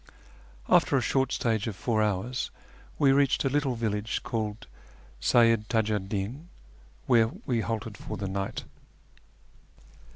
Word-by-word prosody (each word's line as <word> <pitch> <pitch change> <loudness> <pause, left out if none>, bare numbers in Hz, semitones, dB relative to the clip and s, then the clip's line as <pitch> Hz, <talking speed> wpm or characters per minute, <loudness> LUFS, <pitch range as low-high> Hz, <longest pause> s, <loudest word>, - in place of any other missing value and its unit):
After 140 - +4
a - - +4
short 135 +2 +1
stage 110 -2 0
of 110 - -3
four 110 +3 0
hours 105 +5 -1 0.5
we 140 -2 +5
reached 140 0 +3
a - - +3
little 140 -2 0
village 110 -1 -2
called 110 -3 -3 0.6
Seyyid 115 - +4
Tiiju 110 -2 +1
'd 95 0 -10
Din, 115 - -4 0.6
where 115 -2 +5 0.2
we 120 -3 +1
halted 110 -2 -4
for 110 - -6
the 100 0 -3
night. 95 +1 -3
115 Hz, 135 wpm, -28 LUFS, 105-125 Hz, 0.6 s, we